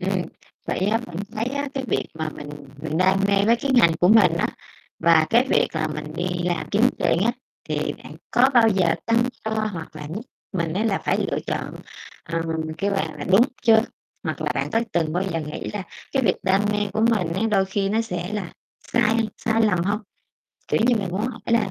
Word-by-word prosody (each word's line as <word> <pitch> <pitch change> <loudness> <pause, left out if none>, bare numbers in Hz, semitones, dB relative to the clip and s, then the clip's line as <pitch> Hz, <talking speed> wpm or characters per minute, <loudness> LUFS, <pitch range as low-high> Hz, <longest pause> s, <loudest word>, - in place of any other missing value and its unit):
ừm. 190 0 0 0.4
Vậy - - -1
á, 210 +4 +2
bạn 170 - -9 0.2
thấy 220 +1 -2
á, 280 +3 -2
cái 270 -1 -2
việc - - 0
mà 160 0 -3
mình 145 -1 -8 0.3
mình 160 +1 -2
đam 190 +1 +4
mê 200 0 +3
với 235 +2 +5
cái 275 +4 -2
ngành 200 -10 +6
của 180 - +5
mình 220 +2 +6
á, - - +1 0.5
và 160 -2 +5
cái 240 +3 +4
việc - - +3
là 155 - 0
mình 150 - -5
đi 175 - -1 0.2
làm 175 -2 -1
kiếm 210 +2 +2 0.2
tiền - - +2
á, 235 - +2 0.4
thì - - -1
bạn - - -10 0.2
có 250 +2 +5
bao 235 -2 +6
giờ 190 -5 +2
tăng 230 0 +3 0.2
cho 220 - -1 0.2
hoặc 160 -3 -8
là 150 -1 -7
giúp 210 - -4 0.3
mình 170 -4 -1
á 200 +6 0
là 210 -4 +1
phải - - 0
lựa - - 0
chọn, - - -3 0.5
ờm, 165 0 -2 0.3
kêu 200 - 0
bằng 195 -1 -1
là, - - -4
đúng 195 +5 +5 0.2
chưa? 220 -2 +6 0.4
Hoặc - - -3
là - - 0
bạn - - -2
có 225 - +2
từng 160 -2 0
bao 180 +2 0
giờ 165 - -1
nghĩ 150 -1 -5
là 205 -2 -3 0.3
cái 270 - +1
việc 185 -5 +2
đam 190 0 +3
mê 210 - 0
của 220 - -1
mình 180 -7 0
á, 190 - -1
đôi 195 -2 +3
khi 195 +1 -1
nó 220 +2 +1
sẽ 180 -4 -4
là 205 -5 -4 0.4
sai 235 -2 +3 0.2
sai 225 -1 +1
lầm 185 -6 +2
hông? 205 +3 0 0.7
Kiểu - - +1
như, 245 - +5
mình 200 -3 -2
muốn 185 +3 -2
hỏi 250 -2 -6
là 230 -2 +2
195 Hz, 225 wpm, -23 LUFS, 175-225 Hz, 0.7 s, ngành